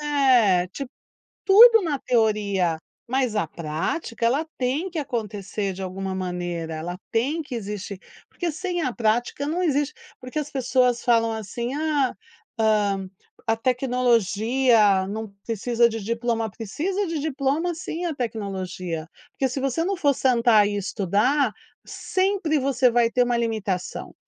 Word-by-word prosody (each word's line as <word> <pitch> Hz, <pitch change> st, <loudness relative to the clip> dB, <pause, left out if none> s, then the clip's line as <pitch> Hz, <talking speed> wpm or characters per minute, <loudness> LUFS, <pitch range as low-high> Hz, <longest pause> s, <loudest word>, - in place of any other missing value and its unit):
É, 255 Hz, -11 st, +3 dB
Tipo 260 Hz, +7 st, -7 dB, 0.6 s
tudo 450 Hz, +3 st, +9 dB
na 300 Hz, -5 st, -1 dB
teoria, 205 Hz, -7 st, +1 dB, 0.3 s
mas 255 Hz, -2 st, 0 dB
a 190 Hz, -6 st, +1 dB
prática 170 Hz, -, -3 dB
ela 280 Hz, +7 st, +1 dB
tem 270 Hz, +9 st, -1 dB
que 340 Hz, -, -5 dB
acontecer 210 Hz, -7 st, -3 dB
de 185 Hz, -, -9 dB
alguma 190 Hz, +1 st, -4 dB
maneira, 175 Hz, -3 st, -3 dB
ela 175 Hz, +3 st, -5 dB
tem 275 Hz, +9 st, 0 dB
que 280 Hz, -, -8 dB
existir, 205 Hz, -3 st, -5 dB, 0.3 s
porque 345 Hz, -3 st, -3 dB
sem 355 Hz, +1 st, -3 dB
a 255 Hz, -4 st, -1 dB
prática 240 Hz, +5 st, 0 dB
não 335 Hz, +5 st, -1 dB
existe 295 Hz, -3 st, +1 dB, 0.3 s
porque 255 Hz, +4 st, -5 dB
as 295 Hz, -1 st, -3 dB
pessoas 250 Hz, -2 st, +1 dB
falam 230 Hz, -2 st, +3 dB
assim: 225 Hz, +3 st, -4 dB
"Ah, 295 Hz, -4 st, 0 dB, 0.5 s
hã, 205 Hz, -3 st, +1 dB, 0.4 s
a 225 Hz, 0 st, +2 dB
tecnologia 235 Hz, -4 st, +2 dB
não 220 Hz, +2 st, -4 dB, 0.2 s
precisa 235 Hz, +1 st, +2 dB
de 225 Hz, -2 st, -5 dB
diploma", 230 Hz, 0 st, -1 dB
precisa 335 Hz, -, -3 dB
de 330 Hz, -2 st, -2 dB
diploma 295 Hz, +3 st, 0 dB
sim 350 Hz, 0 st, -5 dB
a 330 Hz, -, -2 dB
tecnologia, 190 Hz, -, -4 dB, 0.2 s
porque 265 Hz, -, 0 dB
se 260 Hz, +2 st, -4 dB
você 270 Hz, +3 st, 0 dB
não 390 Hz, +2 st, -1 dB
for 290 Hz, -5 st, +3 dB
sentar 235 Hz, -5 st, +4 dB
e 205 Hz, -, -2 dB
estudar, 210 Hz, -, +1 dB, 0.3 s
sempre 375 Hz, -5 st, 0 dB
você 260 Hz, -2 st, +2 dB
vai 235 Hz, -1 st, +3 dB
ter 250 Hz, -, +2 dB
uma 245 Hz, 0 st, 0 dB
limitação, 215 Hz, -6 st, -3 dB
235 Hz, 145 wpm, -24 LUFS, 205-280 Hz, 0.6 s, tudo